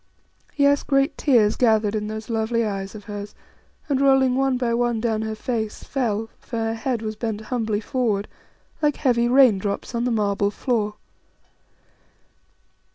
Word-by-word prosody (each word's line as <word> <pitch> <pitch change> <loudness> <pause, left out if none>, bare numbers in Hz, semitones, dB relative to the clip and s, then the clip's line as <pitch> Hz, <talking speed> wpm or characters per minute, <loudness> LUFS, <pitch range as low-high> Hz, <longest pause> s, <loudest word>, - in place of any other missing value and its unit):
Yes, 285 0 +4
great 275 +2 +1
tears 225 -7 +3
gathered 220 -4 +2
in 210 -1 -2
those 215 0 -6
lovely 230 0 0
eyes 195 -1 -4
of 210 - -9
hers 205 0 -7 0.5
and, 275 -3 +1
rolling 270 -2 +4
one 270 -1 +1
by 240 -2 0
one 240 -1 +1
down 220 -1 0
her 220 0 -3
face, 220 -1 -3
fell 225 -5 -1
for 235 - -6
her 225 0 -1
head 230 0 -2
was 215 0 -3
bent 220 -1 -3
humbly 220 -2 -2
forward 220 -5 -1 0.5
like 295 -1 +2
heavy 240 -4 +2
raindrops 230 -6 +3
on 235 +1 -1
the - - +1
marble 205 -3 +1
floor. 210 -1 -1
225 Hz, 155 wpm, -23 LUFS, 215-255 Hz, 0.5 s, Yes